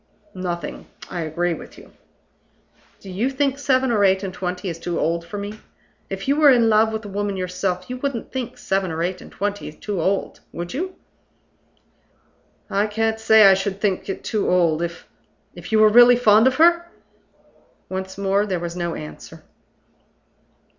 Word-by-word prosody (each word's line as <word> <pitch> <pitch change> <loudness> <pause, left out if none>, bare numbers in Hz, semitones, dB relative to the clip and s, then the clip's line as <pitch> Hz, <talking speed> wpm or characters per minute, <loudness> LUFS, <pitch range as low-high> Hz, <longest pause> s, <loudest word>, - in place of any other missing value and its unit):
"Nothing. 175 -2 -5 0.2
I 175 - -3
agree 170 +2 -1
with - - -10
you." - - -15 1.1
"Do 195 - -10
you 215 +8 0
think 275 0 -1
seven 265 -2 +2
or 210 -3 +2
eight 190 0 +3
and 190 -1 -4
twenty 180 +1 -4
is 165 -2 -4
too 170 0 -3
old 170 +1 0
for 175 +5 -8
me? 205 +1 -6 0.5
If 195 +3 -5
you 280 - +3
were 305 -2 +6
in 235 -4 +5
love 220 +1 +4
with 220 0 -5
a - - -6
woman 200 0 -3
yourself, 180 0 -3
you 250 - -5
wouldn't 255 -3 -4
think 255 -3 -5
seven 195 -1 -1
or 165 +1 -2
eight 180 +1 -3
and - - -13
twenty 205 -4 -4
too 190 +3 -4
old 195 +4 -1
would 175 0 -6
you?" 365 +7 -4 1.7
"I 200 +2 0
can't 220 +1 -1
say 220 -1 +6
I 195 - +8
should 195 0 -2
think 200 -2 -1
it 195 - -5
too 215 -2 -1
old, 170 -3 +2
if 170 -1 -5 0.2
" - - -42
"If - - -10
you 220 - +3
were 215 0 +7
really 240 +2 +7
fond 225 -1 +5
of 260 - +2
her?" 340 +2 +4 1.0
Once 190 0 -5
more 200 +1 +1
there 185 -3 -1
was 170 0 -5
no 170 -2 -3
answer. 75 0 -10
200 Hz, 180 wpm, -22 LUFS, 180-225 Hz, 1.7 s, I